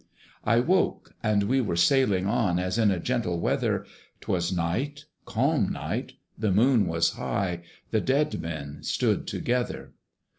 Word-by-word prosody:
I 115 Hz, +2 st, +4 dB
woke, 180 Hz, +8 st, +1 dB
and 105 Hz, -2 st, +2 dB
we 130 Hz, +6 st, +2 dB
were 100 Hz, -8 st, -1 dB
sailing 100 Hz, -1 st, +3 dB
on 105 Hz, -4 st, +1 dB
As 90 Hz, +4 st, -1 dB
in 110 Hz, -2 st, +4 dB
a 95 Hz, -3 st, 0 dB
gentle 100 Hz, -5 st, -1 dB
weather: -, -, 0 dB, 0.4 s
'Twas 85 Hz, -1 st, -1 dB
night, 95 Hz, -, -2 dB, 0.2 s
calm -, -, +1 dB
night, -, -, -4 dB, 0.2 s
the 105 Hz, -2 st, 0 dB
Moon 115 Hz, +3 st, +4 dB
was 85 Hz, 0 st, +2 dB
high; 90 Hz, -3 st, -2 dB, 0.3 s
The 110 Hz, -, +2 dB
dead 145 Hz, +3 st, +1 dB
men 75 Hz, -3 st, -6 dB
stood -, -, 0 dB
together. 125 Hz, 0 st, -2 dB
105 Hz, 145 wpm, -27 LUFS, 85-125 Hz, 0.4 s, I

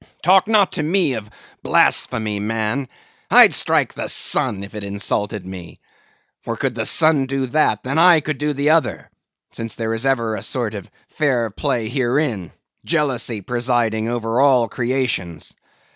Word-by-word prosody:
Talk 190 Hz, +3 st, +4 dB
not 210 Hz, -3 st, +3 dB
to -, -, -3 dB
me 165 Hz, -2 st, +1 dB
of 110 Hz, -3 st, -6 dB, 0.3 s
blasphemy, 105 Hz, -2 st, +1 dB
man; 110 Hz, +5 st, -2 dB, 0.4 s
I'd -, -, +7 dB
strike -, -, +2 dB
the -, -, -5 dB
sun 100 Hz, -1 st, +1 dB
if 100 Hz, -, -10 dB
it 105 Hz, -1 st, -6 dB
insulted 100 Hz, 0 st, -2 dB
me. 90 Hz, -2 st, -10 dB, 0.6 s
For -, -, -5 dB
could -, -, -1 dB
the -, -, -3 dB
sun 155 Hz, -4 st, +3 dB
do 135 Hz, 0 st, -2 dB
that, 150 Hz, +5 st, +1 dB
then 135 Hz, +4 st, -2 dB, 0.3 s
could 155 Hz, 0 st, -2 dB
I -, -, -18 dB
do 150 Hz, 0 st, 0 dB
the 145 Hz, +1 st, +1 dB
other; 105 Hz, -, 0 dB, 0.4 s
since 115 Hz, -1 st, -6 dB
there 115 Hz, -1 st, -3 dB
is 115 Hz, +1 st, -3 dB
ever 115 Hz, -4 st, 0 dB
a -, -, -4 dB
sort 120 Hz, -5 st, -3 dB
of 100 Hz, -3 st, -8 dB, 0.2 s
fair 125 Hz, -7 st, 0 dB
play 120 Hz, -1 st, -2 dB
herein, 120 Hz, -, -1 dB, 0.3 s
jealousy 130 Hz, -9 st, -1 dB
presiding 120 Hz, -1 st, -1 dB
over 120 Hz, +1 st, -1 dB
all 130 Hz, -4 st, +4 dB
creations. 120 Hz, -9 st, -3 dB
120 Hz, 160 wpm, -20 LUFS, 110-140 Hz, 0.6 s, I'd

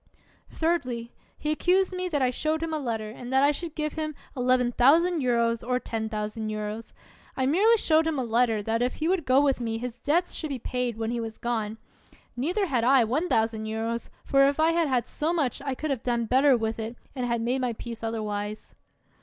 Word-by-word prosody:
Thirdly, 255 Hz, -8 st, -1 dB, 0.3 s
he 305 Hz, -, -2 dB
accused 370 Hz, +4 st, +2 dB
me 365 Hz, 0 st, -1 dB
that 290 Hz, -5 st, 0 dB
I 250 Hz, -, +2 dB
showed 310 Hz, +5 st, -1 dB
him 325 Hz, -1 st, -3 dB
a 310 Hz, -, 0 dB
letter 225 Hz, -5 st, -3 dB
and 245 Hz, +2 st, -8 dB
that 265 Hz, +1 st, +4 dB
I 285 Hz, -, +5 dB
should 320 Hz, +1 st, -6 dB
give 305 Hz, -1 st, -2 dB
him 310 Hz, -1 st, -3 dB, 0.2 s
£11,000 250 Hz, -1 st, +3 dB
or 250 Hz, 0 st, +1 dB
£10,000. 215 Hz, -1 st, -4 dB, 0.4 s
I 260 Hz, -, +1 dB
merely 405 Hz, -, +4 dB
showed 320 Hz, -5 st, +3 dB
him 320 Hz, -2 st, -1 dB
a 260 Hz, -, 0 dB
letter, 230 Hz, -2 st, +2 dB
that 225 Hz, +2 st, 0 dB
if 250 Hz, +1 st, 0 dB
he 310 Hz, -, -2 dB
would 350 Hz, -5 st, 0 dB
go 260 Hz, +2 st, +5 dB
with 275 Hz, -3 st, +1 dB
me 225 Hz, -1 st, -2 dB
his 245 Hz, +1 st, -6 dB
debts 345 Hz, +5 st, +1 dB
should 310 Hz, -, -4 dB
be 275 Hz, -, -2 dB
paid 250 Hz, -1 st, -2 dB
when 225 Hz, 0 st, -2 dB
he 240 Hz, -, -2 dB
was 225 Hz, -1 st, -5 dB
gone: 225 Hz, -2 st, -2 dB, 0.6 s
neither 350 Hz, -, 0 dB
had 255 Hz, -9 st, 0 dB
I 255 Hz, -1 st, +5 dB
£1,000, 225 Hz, -4 st, -1 dB, 0.2 s
for 275 Hz, 0 st, +5 dB
if 280 Hz, +2 st, 0 dB
I 320 Hz, +1 st, +4 dB
had 335 Hz, -1 st, +2 dB
had 255 Hz, -3 st, +1 dB
so 315 Hz, +3 st, -2 dB
much 285 Hz, -8 st, -1 dB
I 275 Hz, -2 st, -3 dB
could 310 Hz, +2 st, -3 dB
have 260 Hz, -4 st, -2 dB
done 235 Hz, -2 st, 0 dB
better 260 Hz, +3 st, +4 dB
with 225 Hz, 0 st, -2 dB
it 225 Hz, +2 st, -4 dB, 0.2 s
and 235 Hz, -3 st, -1 dB
made 255 Hz, +2 st, 0 dB
my 250 Hz, -2 st, 0 dB
peace 230 Hz, 0 st, -8 dB
otherwise. 215 Hz, -2 st, -4 dB
250 Hz, 200 wpm, -27 LUFS, 230-305 Hz, 0.6 s, I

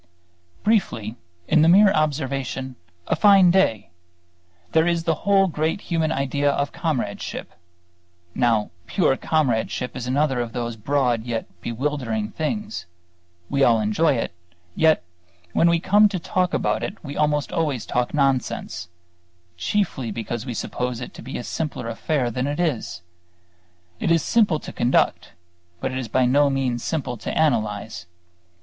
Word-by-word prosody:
Briefly, 145 Hz, -, +1 dB, 0.3 s
in 155 Hz, -, +4 dB
the 160 Hz, -, +5 dB
mere 195 Hz, +3 st, +7 dB
observation 135 Hz, -4 st, -1 dB, 0.3 s
"a -, -, +1 dB
fine 190 Hz, +1 st, +6 dB
day" 110 Hz, -, +2 dB, 0.8 s
there 160 Hz, +1 st, +3 dB
is 170 Hz, -1 st, +1 dB
the 165 Hz, -, +2 dB, 0.2 s
whole 195 Hz, -1 st, +6 dB
great 160 Hz, +1 st, -1 dB
human 165 Hz, -4 st, -1 dB
idea 140 Hz, 0 st, 0 dB
of 140 Hz, 0 st, 0 dB
comradeship. 130 Hz, -, -3 dB, 0.8 s
Now, 115 Hz, -2 st, +1 dB, 0.2 s
pure 160 Hz, -8 st, +2 dB
comradeship 125 Hz, -5 st, 0 dB
is 125 Hz, -2 st, -5 dB
another 135 Hz, 0 st, +1 dB
of 120 Hz, -2 st, -3 dB
those 120 Hz, -1 st, -3 dB
broad 125 Hz, +1 st, +1 dB
and 110 Hz, -, -11 dB
yet 115 Hz, -1 st, -5 dB
bewildering 120 Hz, -4 st, -2 dB
things. 210 Hz, -, -3 dB, 0.6 s
We 140 Hz, 0 st, +1 dB
all 115 Hz, -3 st, +5 dB
enjoy 110 Hz, +9 st, +2 dB
it; 115 Hz, -, -3 dB, 0.4 s
yet 160 Hz, -, +4 dB, 0.5 s
when 170 Hz, -, +4 dB
we 170 Hz, 0 st, +3 dB
come 205 Hz, +4 st, +5 dB
to 195 Hz, -, -2 dB
talk 180 Hz, +1 st, 0 dB
about -, -, 0 dB
it 205 Hz, -, -4 dB
we 145 Hz, -2 st, -6 dB
almost 150 Hz, -1 st, +1 dB
always 150 Hz, -8 st, -1 dB
talk 125 Hz, 0 st, -1 dB
nonsense, 130 Hz, -, -1 dB, 0.7 s
chiefly 130 Hz, -, -1 dB
because 115 Hz, +3 st, -4 dB
we 120 Hz, -, -4 dB
suppose 125 Hz, +1 st, -3 dB
it 125 Hz, -, -7 dB
to -, -, -10 dB
be 130 Hz, +4 st, -6 dB
a -, -, -5 dB
simpler 145 Hz, -6 st, -4 dB
affair 125 Hz, +2 st, -1 dB
than 125 Hz, +3 st, -2 dB
it 145 Hz, +2 st, -3 dB
is. 135 Hz, -, -2 dB, 1.0 s
It -, -, -1 dB
is 165 Hz, -2 st, +3 dB
simple 210 Hz, -9 st, +3 dB
to -, -, -8 dB
conduct; 120 Hz, -, +1 dB, 0.5 s
but 130 Hz, -, -2 dB
it 130 Hz, -, -3 dB
is 125 Hz, -, -4 dB
by 130 Hz, +1 st, +2 dB
no 140 Hz, +3 st, +4 dB
means 130 Hz, -3 st, -1 dB
simple 135 Hz, -7 st, -2 dB
to -, -, -6 dB
analyze. 110 Hz, -, 0 dB
135 Hz, 155 wpm, -23 LUFS, 120-160 Hz, 1.0 s, mere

